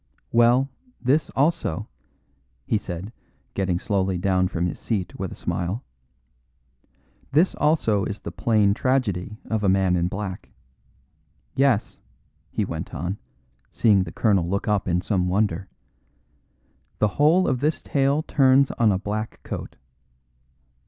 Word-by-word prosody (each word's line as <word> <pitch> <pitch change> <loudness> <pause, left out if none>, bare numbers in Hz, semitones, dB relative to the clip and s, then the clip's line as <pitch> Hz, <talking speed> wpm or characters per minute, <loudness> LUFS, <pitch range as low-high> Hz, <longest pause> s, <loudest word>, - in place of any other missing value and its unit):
Well, 120 +3 +4 0.3
this 140 +5 +1
also," 140 - 0 0.8
he 110 - +1
said, 95 +3 -6 0.4
getting 95 -3 0
slowly 95 -1 0
down 95 0 +2
from 85 -1 -2
his 90 - -3
seat 100 -6 -3
with - - -3
a - - -7
smile, 95 +8 -3 1.5
"this 160 +7 +4
also 115 -10 +2
is 100 - -4
the - - -7
plain 105 -4 +2
tragedy 110 -6 0
of 110 -1 -2
a 100 - +3
man 95 -1 +3
in 85 0 +1
black. 95 0 -5 1.0
Yes," 135 -6 +1 0.5
he - - -1
went - - -6
on, 90 +7 -3 0.5
seeing 105 -4 +3
the 85 - -7
colonel 95 -6 +2
look 100 +2 -1
up 105 -2 +1
in 90 0 +1
some 90 -2 0
wonder, 95 -1 0 1.3
"the 105 - +2
whole 165 +6 +5
of 130 -2 +1
this 150 +4 0
tale 140 +2 +1
turns 135 -1 +4
on 115 -3 +3
a 95 - +2
black 105 +2 -4
coat. - - -6
105 Hz, 135 wpm, -24 LUFS, 95-130 Hz, 1.5 s, whole